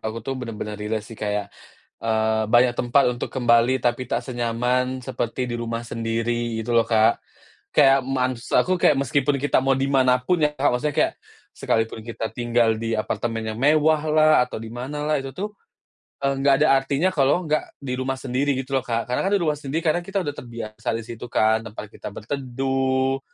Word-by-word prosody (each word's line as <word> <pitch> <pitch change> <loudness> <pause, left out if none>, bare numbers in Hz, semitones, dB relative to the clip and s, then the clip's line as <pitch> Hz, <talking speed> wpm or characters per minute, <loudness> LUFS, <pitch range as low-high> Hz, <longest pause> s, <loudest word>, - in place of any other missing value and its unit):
aku 110 +1 -5
tuh 135 - -2
bener-bener 110 -3 -5
relate 105 0 -2
sih 110 - -12
kayak, 105 -2 -3 0.5
eee, 110 -1 +1
"Banyak 120 +2 +5
tempat 130 +3 +3
untuk 120 - -5
kembali, 120 0 +3
tapi 120 +1 -1
tak - - -1
senyaman 125 +1 -1
seperti 125 0 -3
di - - -2
rumah 115 0 -3
sendiri." 115 0 -2
Gitu 115 +2 -3
loh 115 -1 +3
Kak. 110 0 +3 0.6
Kayak 135 -1 +5
maksud 130 -2 -1
aku 185 -1 0
kayak 150 - +5
meskipun 140 +1 +1
kita 145 -1 +2
mau 135 0 +2
di 135 - 0
mana 130 -2 +4
pun 170 +7 0
ya, 150 -1 +2
Kak, 145 +1 +2
maksudnya 145 +4 -1
kayak - - +2 0.4
sekalipun 115 0 -1
kita 115 -1 -4
tinggal 120 -1 +2
di 115 0 -1
apartemen 115 +1 -2
yang 110 - -7
mewahlah, 155 +1 +4
atau - - -6
di 115 - -7
manalah, 145 +4 -2
itu 135 0 -7
tuh, 210 +2 -4 0.7
eee, 140 0 +1
enggak 140 0 +4
ada - - +4
artinya 140 +6 0
kalau 145 +2 +2
enggak 155 -2 -1 0.2
di 125 -2 -2
rumah 130 0 -1
sendiri 135 +3 0
gitu 135 +1 -3
loh, - - -9
Kak, 115 -1 -2
karena 125 - 0
kan - - 0
di 200 - +1
rumah 155 -2 +1
sendiri, 150 +3 -3
karena 160 +1 +2
kita 195 +1 -2
udah 145 - -2
terbiasa 115 -3 -7
di 115 - -4
situ 115 +1 -8
kan, 110 +1 +2
tempat 105 0 -8
kita - - -9
berteduh, 135 +2 -1
125 Hz, 190 wpm, -23 LUFS, 115-140 Hz, 0.7 s, Banyak